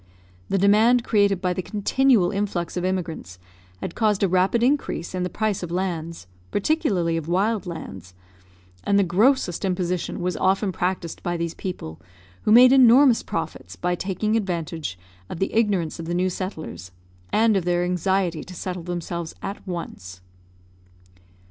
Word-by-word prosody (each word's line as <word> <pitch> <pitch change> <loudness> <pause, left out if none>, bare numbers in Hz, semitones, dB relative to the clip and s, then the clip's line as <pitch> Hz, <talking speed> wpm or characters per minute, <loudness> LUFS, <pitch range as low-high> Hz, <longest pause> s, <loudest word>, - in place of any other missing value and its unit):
The 195 - +1
demand 215 +5 +4
created 200 -4 +2
by 180 -1 0
the 185 - -3
continual 210 0 +2
influx 195 -4 -2
of 180 - -2
immigrants 170 - -3 0.4
had - - -4
caused 210 -3 +1
a - - +4
rapid 185 +6 +2
increase 260 - 0
in 185 - -2
the 180 - -1
price 215 +2 -1
of 175 - -5
lands, 170 - -3 0.2
particularly 200 - 0
of 160 -1 -5
wild 200 +3 0
lands, 95 - -8 0.7
and 200 - +2
the 200 - +4
grossest 195 +1 +2
imposition 180 -2 -2
was 180 0 -2
often 190 +1 +1
practiced 180 -2 -3
by 175 0 -2
these 170 0 -3
people, 130 - -7 0.4
who - - +3
made 250 +3 +8
enormous 255 -1 +6
profits - - -5
by 180 0 -1
taking 200 +4 -1
advantage 165 - -3 0.3
of - - -6
the 195 - -2
ignorance 200 -8 +1
of 165 - -5
the 175 - -2
new 185 +1 +1
settlers 165 - -6 0.4
and 220 0 +3
of 190 - +1
their 175 0 +1
anxiety 180 -2 0
to 180 - -11
settle 180 +1 -5
themselves 170 -1 -5
at 200 - -5
once. 95 - -6
185 Hz, 155 wpm, -23 LUFS, 170-205 Hz, 0.7 s, made